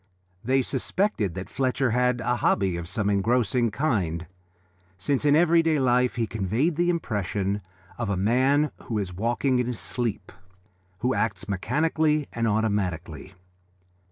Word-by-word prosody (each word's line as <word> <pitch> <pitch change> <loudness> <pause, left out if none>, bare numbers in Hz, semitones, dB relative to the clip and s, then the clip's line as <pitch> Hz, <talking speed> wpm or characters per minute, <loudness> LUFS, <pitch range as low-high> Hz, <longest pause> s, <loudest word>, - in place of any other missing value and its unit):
They 130 +2 +2
suspected 130 - -1
that 95 0 -5
Fletcher 130 -1 0
had 125 +1 +1
some 125 +2 0
hobby 95 -6 +1
of 85 0 -5
an 105 -2 +1
engrossing 115 +3 +2
kind, 95 - -1 0.7
since 135 +9 -1
in 145 0 +5
everyday 165 -1 +4
life 125 -2 +2
he 115 -2 0
conveyed 110 - -1
the 175 +2 +1
impression 105 - -1 0.4
of 115 -4 -2
a 100 - 0
man 130 +9 +2
who 110 - -2
is 95 -4 -3
walking 120 +6 0
in 125 - 0
his 125 -3 -3
sleep, 120 -4 -3 0.7
who 125 +2 +1
acts 110 -7 -1
mechanically 150 - 0
and 115 -1 0
automatically. 95 -5 -2
120 Hz, 140 wpm, -25 LUFS, 100-135 Hz, 0.7 s, in